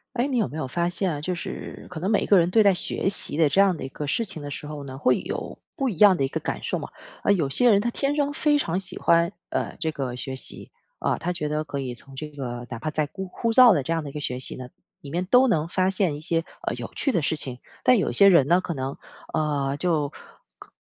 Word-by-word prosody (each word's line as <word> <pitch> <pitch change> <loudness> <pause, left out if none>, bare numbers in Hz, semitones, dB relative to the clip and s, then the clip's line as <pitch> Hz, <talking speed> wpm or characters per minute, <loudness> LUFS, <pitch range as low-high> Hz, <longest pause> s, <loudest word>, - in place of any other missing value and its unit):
诶， 250 +3 +1
你 260 -3 0
有 225 - +2
没 135 - -8
有 155 - -2
发 170 +6 0
现 180 0 0
啊， 145 - -4
就 180 +5 -2
是 175 - -7
可 180 - -6
能 180 +4 -2
每 210 - +3
一 - - -2
个 200 - +6
人 170 0 +3
对 220 +5 +4
待 200 -1 +5
学 185 - -1
习 195 - -2
的 160 -1 +4
这 190 - +3
样 195 -3 +4
的 - - -8
一 - - -4
个 145 +2 -6
事 230 +11 0
情 190 -6 -5
的 145 - -6
时 145 +1 -6
候 145 -1 -7
呢， 130 -1 -8
会 130 -2 +2
有 - - -5 0.2
不 270 -1 -1
一 195 - -3
样 200 -1 +7
的 140 - 0
一 - - 0
个 - - -3
感 - - -4
受 - - -2
嘛。 - - -6 0.4
啊， - - +5
有 160 -8 0
些 245 - +5
人 205 -3 +5
他 235 - -1
天 275 +4 -1
生 290 -1 0
非 295 0 +2
常 180 - 0
喜 190 - -4
欢， 170 0 +3 0.2
呃， - - -3
这 160 - 0
个 135 -5 -4
学 130 +1 -5
习， - - -4 0.3
啊， - - 0
他 180 - -2
觉 155 -4 -3
得 150 +1 -1
可 140 -2 -4
以 125 -2 -4
从 135 +3 -15
这 150 +3 -6
个 125 -5 -6
哪 115 - -5
怕 155 - -3
再 155 -1 0
枯 190 +4 -6
枯 230 +5 -2
燥 245 -2 +8
的 145 - +1
这 165 - -2
样 165 -2 -1
的 145 - -6
一 - - -12
个 150 - -5
学 125 -3 -3
习 130 - -1
呢， 125 -1 -8 0.3
里 140 - -10
面 175 +4 -1
都 250 +6 +5
能 160 -8 +1
发 185 +2 +1
现 185 -5 0
一 - - -8
些， 165 0 0 0.2
呃， - - -2
有 - - -7
趣 275 - 0
的 180 - +1
事 150 - 0
情， 130 -5 -6 0.2
但 250 - +5
有 - - 0
些 200 - +6
人 170 -8 +6
呢， 175 +4 +4
可 180 - -4
能 135 -2 -4 0.4
啊， 145 -3 0
就 150 -3 0 0.5
可 - - -14
165 Hz, 310 characters per minute, -25 LUFS, 140-195 Hz, 0.5 s, 燥